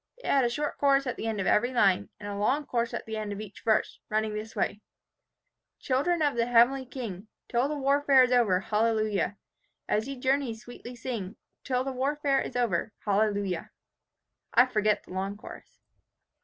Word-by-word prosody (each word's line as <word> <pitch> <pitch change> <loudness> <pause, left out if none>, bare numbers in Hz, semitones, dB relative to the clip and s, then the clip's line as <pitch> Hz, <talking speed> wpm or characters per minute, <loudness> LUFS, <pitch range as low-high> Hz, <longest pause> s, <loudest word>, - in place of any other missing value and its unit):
It - - -15
had 275 -2 +3
a 240 - +2
short 295 +5 -3
chorus 275 -1 +3
at 250 - -2
the 225 - -4
end 220 -2 -2
of 190 - -1
every 245 +6 +3
line, 200 -7 +2
and 205 - -7
a 205 - -4
long 265 +9 +1
chorus 235 -2 -1
at - - -5
the 220 -1 -4
end 215 -1 -4
of 200 - -5
each 210 -2 -9
verse, 220 -2 +1
running 215 0 0
this 215 +1 -6
way, 205 - -1 1.0
"'Children 310 +6 0
of 290 -3 +1
the 235 0 +1
heavenly 245 +2 +4
King, 220 -6 -6 0.2
Till 245 +3 +1
the 300 0 -3
warfare 275 -1 +4
is 250 - +1
over, 215 -7 +3
Hallelujah, 215 -2 0 0.5
As 215 +3 0
ye 275 - -4
journey 265 -2 0
sweetly 245 +1 -10
sing, 230 -5 -5 0.3
Till 255 -2 0
the 270 - -3
warfare 275 +1 0
is - - -6
over, 225 -4 0
Hallelujah.' 200 -3 0 0.9
I 245 - +8
forget 215 -4 +1
the - - -12
long 195 +2 -3
chorus. - - -12
235 Hz, 185 wpm, -28 LUFS, 210-265 Hz, 1.0 s, I